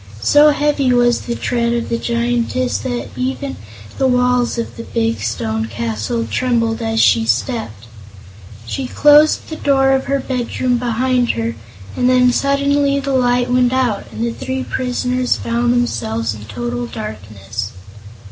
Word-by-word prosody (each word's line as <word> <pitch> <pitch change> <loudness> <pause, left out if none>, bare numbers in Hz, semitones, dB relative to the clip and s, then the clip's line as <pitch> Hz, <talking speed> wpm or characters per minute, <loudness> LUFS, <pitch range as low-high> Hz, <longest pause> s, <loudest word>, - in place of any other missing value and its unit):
So 295 - +6
heavy 290 -3 +1
was 240 -1 +3
the 235 - -4
tread 235 -1 0
of 235 -1 -2
the 230 - -1
Giantess 240 +1 -1
that 245 -2 -4
even 265 +2 -3 0.4
the 265 - +3
walls 250 -1 +2
of 230 - -4
the - - -7
big 230 0 -1
stone 110 -1 -2
castle 115 0 -3
trembled 230 - 0
as 225 0 -1
she 115 - +4
stepped. 115 - -2 0.8
She 260 - -4
closed 295 +3 +4
the 315 - -6
door 270 -1 +3
of 265 0 +1
her 275 - 0
bedroom 250 -1 -1
behind 245 +1 +1
her, 115 0 -2 0.4
and 250 0 +2
then 250 -1 +4
suddenly 280 +1 +1
the 275 0 -2
light 245 -1 +2
went 250 0 +3
out 250 -6 -1
and 230 - -4
the 235 - -1
three 260 +1 -4
prisoners 250 0 -1
found 235 +1 0
themselves 115 - -1
in 105 0 -10
total 120 +2 -4
darkness. 105 0 -6
245 Hz, 150 wpm, -17 LUFS, -, 0.8 s, So